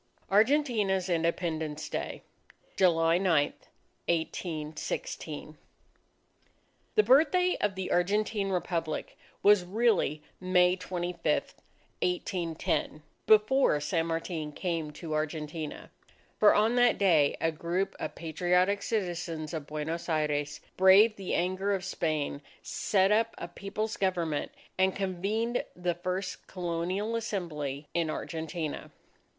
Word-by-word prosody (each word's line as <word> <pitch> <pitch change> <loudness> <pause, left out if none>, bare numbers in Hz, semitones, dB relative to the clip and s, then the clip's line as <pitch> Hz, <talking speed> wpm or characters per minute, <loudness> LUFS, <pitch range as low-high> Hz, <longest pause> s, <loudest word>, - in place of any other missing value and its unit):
ARGENTINA'S 210 -5 +3
INDEPENDENCE 160 -2 -1
DAY - - -4 0.5
July 165 -2 +4
9, 165 -7 +2 0.5
1816 155 -2 -3 1.4
The 430 - +6
Birthday 360 +6 +4
of 205 -2 +1
the 190 -1 -4
Argentine 200 +3 +1
Republic 170 -3 -2 0.3
was 205 -2 +6
really 190 -6 +1 0.2
May 180 -1 +4
25, 180 -1 -5 0.8
1810, 170 -4 -1 0.2
before 215 - +5
San 165 +3 0
Martin 165 -2 -3
came 165 -2 -2
to 155 +1 -6
Argentina. 155 0 -4 0.5
For 210 - +6
on 220 +3 +3
that 245 -1 +5
day 165 -8 +3
a 165 - +1
group 170 +4 -2
of - - -4
patriotic 180 +5 +1
citizens 175 -7 -3
of 155 -3 -4
Buenos 160 +3 -4
Aires 150 -2 -1 0.2
braved 195 +4 +7
the 195 -2 -2
anger 185 +3 0
of 190 -1 -5
Spain, 155 -6 -2 0.2
set 195 -1 +1
up 225 +2 +2
a - - -5
People's 205 +5 -4
Government, 170 -6 -1 0.3
and 190 0 +3
convened 200 +5 -1
the 180 -1 -1
first 185 +2 -4
Colonial 180 +5 -2
Assembly 155 -10 -3
in 170 -2 0
Argentina. 160 0 -4
180 Hz, 110 wpm, -29 LUFS, 160-200 Hz, 1.4 s, braved